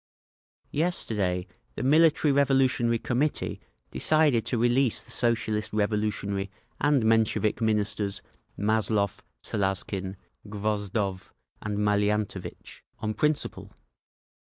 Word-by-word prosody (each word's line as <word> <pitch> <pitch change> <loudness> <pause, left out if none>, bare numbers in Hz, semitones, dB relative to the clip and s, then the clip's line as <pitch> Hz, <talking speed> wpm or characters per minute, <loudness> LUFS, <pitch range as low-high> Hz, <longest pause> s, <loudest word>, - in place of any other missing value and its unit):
"Yesterday 105 - 0 0.3
the - - -4
Military 155 +2 +4
Revolutionary 135 -4 +3
Committee 130 +6 -1 0.3
decided 150 -7 +2
to 125 - 0
release 120 +1 +2
the - - -13
Socialist 110 -3 0
Revolutionary 105 -2 -1 0.3
and 145 -4 +3
Menshevik 110 -1 +2
Ministers, 105 -2 0 0.3
Mazlov, 105 -1 0 0.2
Salazkin, 95 -1 -2 0.3
Gvozdov 100 -2 -2 0.3
and 105 -1 -3
Maliantovitch—on 105 +1 -2
principle. 150 +7 -1
110 Hz, 85 wpm, -27 LUFS, 100-125 Hz, 0.3 s, Military